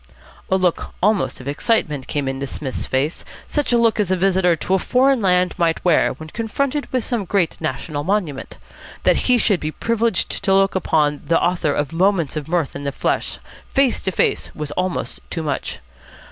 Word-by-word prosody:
'" - - -24
A - - +3
look 180 -2 -1
almost 210 -1 +2
of 125 - -10
excitement 145 - 0
came 145 -2 -2
into 135 +1 -3
Psmith's 135 -1 -5
face, 140 +5 -1 0.2
such 295 -4 -1
a 240 - +4
look 230 -2 +3
as 205 -4 +1
a 185 - +3
visitor 185 -1 +3
to 180 - -2
a 190 - +4
foreign 260 +4 +3
land 180 -2 +3
might 165 0 +1
wear 175 -3 +4
when 155 0 -10
confronted 270 - -2
with 255 -2 0
some 240 -5 -1
great 185 -3 0
national 145 +3 -3
monument. 175 -6 -2 0.5
That - - +4
he 250 - +6
should 205 -5 +2
be 155 - -3
privileged 230 +3 -1
to 195 - +3
look 195 0 +3
upon 150 -5 +1
the 165 - +3
author 175 -4 +1
of 145 +1 -2
"Moments 175 -4 +2
of 150 -2 -4
Mirth" 165 -4 -1
in 140 - -5
the 140 - -1
flesh, - - -1 0.4
face 270 -3 +3
to 190 - -1
face, - - 0
was 150 -1 -5
almost 180 +3 -2
too 165 - -3
much. 145 -3 -3
180 Hz, 195 wpm, -20 LUFS, 150-210 Hz, 0.5 s, he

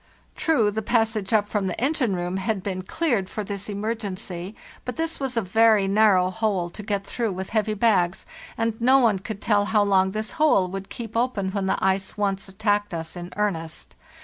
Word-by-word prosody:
True, 235 -11 +2
the 220 +2 -2
passage 220 -3 0
up 210 -2 +3
from 205 -2 -1
the 180 - -3
engine 255 -5 +1
room 175 +1 -2
had 195 0 -2
been 185 -2 -3
cleared 220 - -1
for 215 - -4
this 200 0 -5
emergency, 200 -3 -4 0.3
but 250 - -5
this 325 0 -2
was 265 -3 -3
a 230 - +2
very 215 +1 +4
narrow 195 -3 +4
hole 195 -5 -1
to 210 - -8
get 200 -1 -2
through 230 -3 -2
with 190 +1 -6
heavy 215 -1 +1
bags, 195 -5 +2 0.3
and 225 0 0
no 260 +3 +6
one 225 -7 +3
could 205 +1 -7
tell 205 -2 +3
how 210 0 +3
long 190 -2 +3
this 215 +2 -3
hole 200 -12 +4
would 195 +1 -6
keep 225 -2 -7
open 230 -5 0
when 195 -1 -1
the - - +1
ice 190 +1 0
once 195 -1 -1
attacked 205 -1 0
us 160 0 -5
in 175 0 -7
earnest. 165 -6 -2
205 Hz, 200 wpm, -24 LUFS, 190-225 Hz, 0.3 s, no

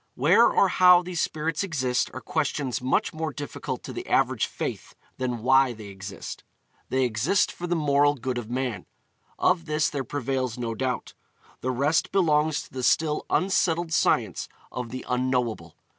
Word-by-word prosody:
Where - - +5
or - - +4
how 180 -1 +6
these 175 -1 -3
spirits 155 +3 -1
exist 130 -9 0
are 130 - -7
questions 145 -5 -2
much 130 - 0
more 160 0 -3
difficult 145 0 -6
to - - -7
the - - -6
average - - +2
faith - - -5 0.2
than 125 -3 -2
why 130 0 +4
they 110 -2 -10
exist. 100 0 -8 0.5
They 130 0 +1
exist 125 - +1
for 175 - -6
the 175 - 0
moral 145 -2 +3
good 125 -1 -3
of 115 -2 -8
man; 125 -6 -3 0.5
of 165 - +2
this 155 0 0
there 140 -2 -2
prevails 130 -2 -2
no 115 -2 -3
doubt. 125 +2 -3 0.5
The 130 - -3
rest 140 +5 +1
belongs 155 -5 +2
to - - -17
the 130 - -4
still 150 +4 +1
unsettled 175 -3 +1
science 110 - +1 0.2
of 125 -2 -5
the 130 +2 -7
Unknowable. 125 -2 -1
135 Hz, 165 wpm, -26 LUFS, 125-155 Hz, 0.5 s, how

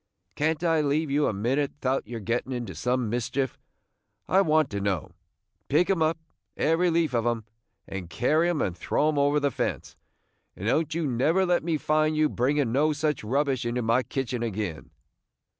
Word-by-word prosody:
"Can't 155 - 0
I 165 -2 +3
leave 145 +1 0
you 145 +1 +2
a - - +1
minute 125 +8 0
'thout 130 -4 -1
your 115 0 -5
gettin' 115 +5 -2
into 120 -6 -4
some 125 +6 -1
mischief, 125 +3 -2 0.7
I 190 - +4
want 155 -6 +2
to 100 -1 -3
know? 95 -3 -1 0.6
Pick 165 +7 +3
'em 185 -4 0
up, 160 +1 +2 0.4
every 165 +3 +2
leaf 165 -4 +1
of 120 -1 +1
'em, 120 -2 0 0.4
and 95 -3 -6
carry 155 - +2
'em 170 -4 0
and 90 - -2
throw 150 +10 +1
'em 150 -2 0
over 145 +1 +3
the 140 -1 0
fence; - - -3 0.6
and 100 - -7
don't 155 +5 +1
you 165 -1 0
never 150 +9 +2
let 175 -3 +1
me 165 -1 0
find 155 +1 +1
you 155 0 +3
bringing 135 0 +1
no 150 +5 +2
such 150 -3 -1
rubbish 135 +2 0
into 120 +1 -1
my 115 +3 +3
kitchen 130 -2 -3
agin!" 105 -8 -4
140 Hz, 185 wpm, -26 LUFS, 120-155 Hz, 0.7 s, I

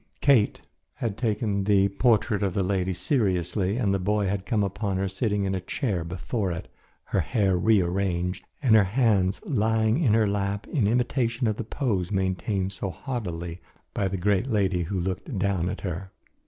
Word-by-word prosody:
Kate 135 -7 +3 0.3
had 110 -4 -3
taken 105 -3 -1
the 100 -1 +4
portrait 105 -1 +2
of 95 -3 -1
the 100 - +1
lady 95 -1 0
seriously, 95 - 0
and 105 -6 +1
the 100 - +1
boy 105 +2 +1
had 95 0 -2
come 110 -4 +1
upon 100 0 -2
her 95 +1 0
sitting 100 +1 -1
in 95 - -1
a 95 - -2
chair 95 - -2
before 90 +4 -3
it, 85 - -5 0.4
her - - -1
hair 95 - +1
rearranged 90 -2 +1 0.2
and 120 -5 +4
her 105 -3 +6
hands 100 -3 +2
lying 110 - +2
in 115 -9 +4
her 110 -2 +3
lap 100 0 -1
in 125 -11 +1
imitation 120 +1 +1
of 110 -2 0
the - - -3
pose 105 -7 -1
maintained 95 0 -1
so 95 0 -4
haughtily 85 -7 -5 0.3
by 100 - 0
the 95 +1 -2
great 100 +5 +1
lady 100 -6 +1
who 95 +3 -2
looked 95 - -3
down 95 -2 0
at - - -5
her. 95 0 -4
100 Hz, 180 wpm, -26 LUFS, 95-110 Hz, 0.4 s, her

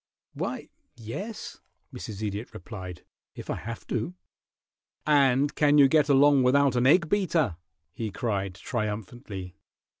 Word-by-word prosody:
"Why, - - -4 0.3
yes," 185 - -7 0.3
Mrs. 110 -1 -7
Idiot 105 +3 -5
replied, 90 -3 -8 0.3
"if - - -6
I - - -1
have 115 +1 -7
to." 125 +9 -3 0.9
"And 140 -1 +4
can 150 -1 +4
you 140 -2 +8
get 150 +1 +3
along 140 0 +6
without 135 +1 +4
an 125 +1 +3
egg 170 +4 +5
beater?" 165 - +1 0.4
he 110 +2 -4
cried, 100 -3 -2
triumphantly. 105 -4 -5
125 Hz, 125 wpm, -27 LUFS, 105-145 Hz, 0.9 s, you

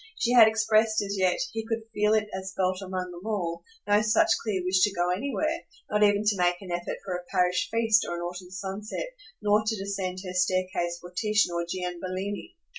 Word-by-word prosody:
She 240 - +1
had 235 -3 +9
expressed 220 0 +3
as 200 0 -3
yet 185 -2 +2
he 225 0 -3
could 225 0 -3
feel 210 +1 +3
it 215 -1 +1
as 190 0 -5
felt 185 0 +1
among 185 -1 -4
them 175 0 -9
all 185 -6 -2 0.2
no 205 +1 +4
such 215 +1 +3
clear 195 -5 -1
wish 185 +1 +2
to 205 - +4
go 175 +1 +1
anywhere, 280 +10 -1 0.3
not 210 0 +2
even 205 0 +4
to 210 -1 +2
make 175 0 +2
an 190 -3 -9
effort 175 0 -3
for 190 - -3
a 180 - -5
parish 180 0 +1
feast, 225 -1 +3
or 175 - -2
an 170 - -5
autumn 180 +1 -6
sunset, 195 - -5 0.3
nor 210 +1 +4
to 220 0 -1
descend 195 -2 -3
her 180 - -5
staircase 185 -1 0
for 175 0 -11
Titian 210 -2 +2
or 170 0 -2
Gianbellini. 185 +2 -4
190 Hz, 205 wpm, -27 LUFS, 180-215 Hz, 0.3 s, had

